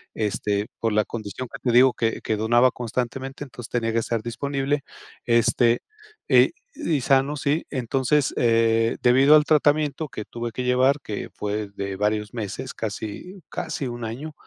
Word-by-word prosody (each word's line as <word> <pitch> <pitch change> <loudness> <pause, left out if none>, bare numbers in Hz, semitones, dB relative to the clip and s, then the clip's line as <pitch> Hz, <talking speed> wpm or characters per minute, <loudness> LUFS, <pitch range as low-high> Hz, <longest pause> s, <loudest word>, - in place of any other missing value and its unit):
este, 105 -1 -1
por 115 - 0
la 105 0 +2
condición 115 +2 -6
que - - -7
te 120 - +1
digo 125 +1 +6
que 115 -1 -1
que 110 - -1
donaba 120 +4 +4
constantemente, 125 +4 -4
entonces 120 -3 -10
tenía 115 -2 -1
que 115 - +2
estar 115 0 -2
disponible, 140 +4 -2 0.4
este, 120 0 +3 0.5
y - - +5 0.2
y 155 -5 -1
sano, 135 +3 +2
¿sí? 145 +4 0
Entonces 135 +2 0
eh, 115 -1 +3
debido 135 +4 +6
al 150 - +6
tratamiento 150 0 +2
que 110 - -6
tuve 120 0 -5
que 125 - -4
llevar, 130 +3 +3
que 105 - -5
fue 105 0 -3
de 100 -1 -4
varios 105 +1 -1
meses, 115 +2 -5
casi 110 - -6
casi 160 -5 -4
1, 120 -1 -5
año, 135 +8 -6
120 Hz, 160 wpm, -24 LUFS, 110-135 Hz, 0.5 s, digo